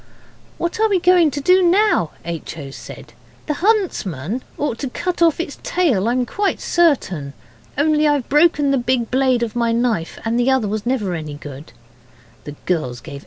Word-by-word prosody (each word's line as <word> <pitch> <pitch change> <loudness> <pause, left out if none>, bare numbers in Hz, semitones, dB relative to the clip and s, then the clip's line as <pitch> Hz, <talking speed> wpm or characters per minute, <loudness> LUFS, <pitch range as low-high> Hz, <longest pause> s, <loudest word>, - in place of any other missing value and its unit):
'What 340 +4 -3
are 440 0 +3
we 390 -3 +2
going 355 -2 +4
to 285 - -4
do 365 +6 +4
now?' 365 - +3 0.2
H. 165 -1 -6
O. 140 -3 -8
said; - - -11 0.3
'the 300 - -1
huntsman 260 - -1 0.2
ought 280 -6 -2
to 275 - -3
cut 355 +7 -3
off 335 -2 +4
its 345 - -5
tail, 255 - +1
I'm 245 +1 +1
quite 405 +9 -1
certain. 190 - +1 0.4
Only, 305 +1 +3
I've 290 -4 +1
broken 295 -1 +3
the 275 - +2
big 240 -1 -1
blade 255 -2 +2
of 235 0 -4
my 235 -1 +1
knife, 230 -8 -1
and 230 +2 0
the 245 +2 +2
other 265 -4 +2 0.2
never 255 0 0
was 180 -2 -2
any 150 -1 -7
good.' 145 0 -10 0.7
The 145 - -7
girls 140 -9 -1
gave 140 +1 -9
H. - - -9
255 Hz, 185 wpm, -19 LUFS, -, 0.7 s, going